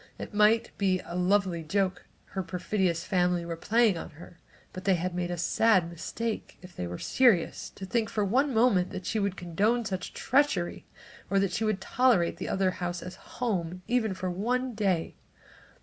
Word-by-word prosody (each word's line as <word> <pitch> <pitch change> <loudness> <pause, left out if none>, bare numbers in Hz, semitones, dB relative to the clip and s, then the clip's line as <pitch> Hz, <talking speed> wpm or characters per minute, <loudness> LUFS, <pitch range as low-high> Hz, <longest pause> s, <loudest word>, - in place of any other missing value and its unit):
It - - -7
might 215 +2 +3
be 190 -2 +2
a - - -8
lovely 180 -1 +1
joke 185 +2 -1 0.3
her 190 - -1
perfidious 180 -1 -1
family 180 -2 +1
were 170 0 -4
playing 210 +1 +2
on - - -7
her, 170 0 -13 0.3
but 185 - -7
they 195 -2 +4
had 180 +1 -2
made 175 0 -2
a 175 - -3
sad 185 +1 +3
mistake, 220 +6 -4
if 180 0 -13
they 90 - -4
were 90 0 -5
serious, 235 -10 +2
to 190 - -7
think 225 +1 0
for 210 -2 0
one 265 +8 +2
moment 195 -6 +2
she 220 - -1
would 200 -2 -1
condone 210 +8 0
such 185 -2 -4
treachery 265 -10 +1 0.4
or 195 - +2
that 195 -1 +2
she 225 - -1
would 215 -3 0
tolerate 230 -6 +2
the - - -5
other 190 -1 +1
house 175 -1 -4
as 180 - -7 0.2
home, 185 -7 -2
even 230 -5 +1
for 185 -1 -3
one 250 +7 -1
day. 195 -6 -1
190 Hz, 180 wpm, -28 LUFS, 175-220 Hz, 0.4 s, they